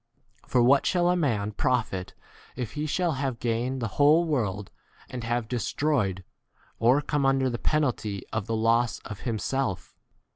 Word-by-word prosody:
For 125 - +3
what 135 +3 +4
shall 175 -1 +2
a - - +2
man 110 - 0
profit 110 -5 -1 0.4
if 120 -4 -4
he 150 +1 -3
shall 175 +3 0
have 135 -3 -2
gained 120 +3 -1
the 115 - -1
whole 155 +4 +6
world 105 - -2 0.4
and 125 -2 -5
have 120 0 -1
destroyed, 120 -5 -1 0.6
or 125 +5 +4
come 145 0 0
under 135 -1 +2
the 120 - -4
penalty 120 -10 -1
of 110 -2 -2
the 115 - -1
28 110 - -1
loss 115 +1 +2
of 105 -3 -8
himself 115 -4 -2
125 Hz, 160 wpm, -27 LUFS, 110-140 Hz, 0.6 s, whole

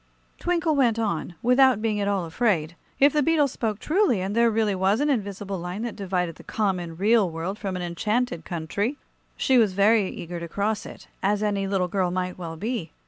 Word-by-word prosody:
Twinkle 340 -3 +1
went 240 -5 +3
on, 200 -6 -2
without 250 -1 +5
being 215 -2 -1
at 200 - 0
all 195 -3 0
afraid. 165 -3 0 0.2
If 280 +1 +5
the 300 - +3
beetle 300 -1 +3
spoke 225 -5 -3
truly, 320 - +2
and 190 +3 -3
there 235 0 +4
really 220 -2 +1
was 190 +4 +2
an 295 +1 +2
invisible 200 -5 -3
line 180 +5 -5
that 235 - -4
divided 180 -4 -2
the - - -13
common, 180 -6 -2
real 210 0 +3
world 170 +5 -4
from 195 -3 -3
an 180 - -3
enchanted 210 +2 -1
country, 195 - -3 0.4
she 260 -2 +3
was 210 -5 +3
very 200 +1 +3
eager 170 0 -6
to 170 - -6
cross 205 +5 -2
it, - - -12
as 205 +2 +1
any 200 -2 0
little 190 -2 0
girl 185 0 0
might 180 0 -2
well 165 -2 -7
be. 210 -4 -3
200 Hz, 200 wpm, -25 LUFS, 180-230 Hz, 0.4 s, without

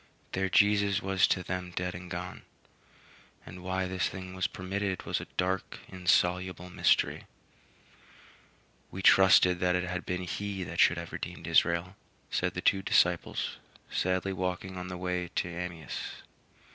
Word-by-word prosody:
Their 95 0 0
Jesus 100 0 +4
was 95 -2 +2
to 90 - 0
them 90 0 -4
dead 90 0 -2
and 90 +1 -8
gone; 90 +1 -5 1.0
and 90 +2 -10
why 95 +1 -1
this 95 0 -1
thing 95 -1 -8
was 95 -1 0
permitted 95 0 -3
was - - -1
a - - -9
dark, 95 +1 -1
insoluble 90 0 +1
mystery. - - +2 1.6
"We 95 - -7
trusted 90 -2 +6
that 90 0 +2
it 90 - 0
had 90 0 -3
been 90 0 -3
he 95 +2 -3
that 85 -1 -6
should 85 - +5
have 85 0 -6
redeemed - - -6
Israel," 85 +3 +2 0.4
said - - 0
the - - -2
two 95 - +3
disciples, - - +1 0.3
sadly 95 +1 0
walking 90 0 -3
on 90 0 -5
the 90 0 -5
way 90 -1 -2
to - - 0
Emmaus. 85 -2 -6
90 Hz, 150 wpm, -30 LUFS, 90-95 Hz, 1.6 s, trusted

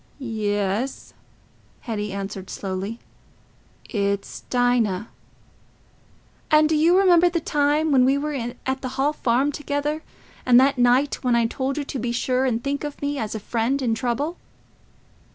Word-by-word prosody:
"Yes," 215 -1 -2 0.7
Hetty 210 -3 -4
answered 195 -1 -6
slowly, 195 +3 -4 0.9
"it's 200 -2 -2
Dinah." 235 -5 +1 1.4
"And 305 0 +5
do 315 - +1
you 330 +4 +4
remember 355 -2 +5
the 340 -1 -1
time 295 +1 +1
when 260 -2 +5
we 270 +2 +3
were 300 +1 -2
at 260 +1 -4
the 255 - -4
Hall 285 +3 +2
Farm 260 +1 +1
together, 295 +1 -2 0.4
and 245 -1 +6
that 275 0 +3
night 250 +5 +3
when 250 -2 +2
I 235 -1 +3
told 265 +4 -2
you 295 - -1
to 275 -1 -5
be 235 +1 -2
sure 255 +2 0
and 235 -2 -1
think 280 +1 -2
of 295 -1 -5
me 285 0 -2
as 215 0 -3
a - - -3
friend 230 +6 -1
in 245 -4 0
trouble?" 255 +9 -2
255 Hz, 150 wpm, -23 LUFS, 225-285 Hz, 1.4 s, and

